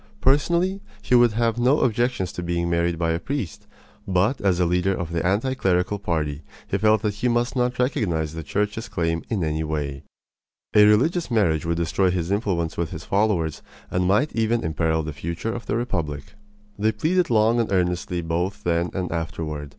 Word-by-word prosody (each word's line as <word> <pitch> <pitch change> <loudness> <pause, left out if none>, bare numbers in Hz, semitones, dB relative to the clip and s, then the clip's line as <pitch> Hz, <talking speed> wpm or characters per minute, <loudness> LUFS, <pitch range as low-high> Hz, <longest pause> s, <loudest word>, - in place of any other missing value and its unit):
Personally, 170 +8 +2 0.2
he - - -1
would 120 -2 +6
have 115 +1 0
no 130 +5 +3
objections 120 -5 0
to - - -6
being 85 0 -1
married 85 0 +1
by 85 -1 0
a 80 - 0
priest; 135 - -5 0.4
but 95 +7 +1
as 95 -3 +2
a 90 - +3
leader 90 +2 +1
of 85 -2 -4
the 85 -1 -1
anti 105 +8 +1
clerical 95 -3 0
party 80 -6 -2 0.3
he 100 - -1
felt 110 +1 +3
that 105 -2 0
he 110 +5 -1
must 120 +1 0
not 125 -1 0
recognize 85 - 0
the 80 - -5
Church's 105 +8 -2
claim 80 -1 -1
in 105 -7 -1
any 80 0 -1
way. 75 -3 -3 0.7
A 105 0 +7
religious 155 +12 +3
marriage 85 - +1
would 85 0 0
destroy 85 +3 +1
his 90 0 -2
influence 95 -6 -1
with 85 -2 -1
his - - -8
followers 95 -7 0 0.3
and 90 0 +1
might 105 +11 +2
even 115 +1 +1
imperil 80 0 0
the 75 0 -5
future 85 +9 -4
of 120 - -7
the - - 0
republic. 80 - -3 0.5
They 110 +2 +2
pleaded 170 - +1
long 115 +1 +3
and 115 - 0
earnestly 90 -1 0
both 90 +5 -2
then 85 0 +1
and 95 -2 -2
afterward. 80 -3 -4
95 Hz, 190 wpm, -23 LUFS, 85-115 Hz, 0.7 s, A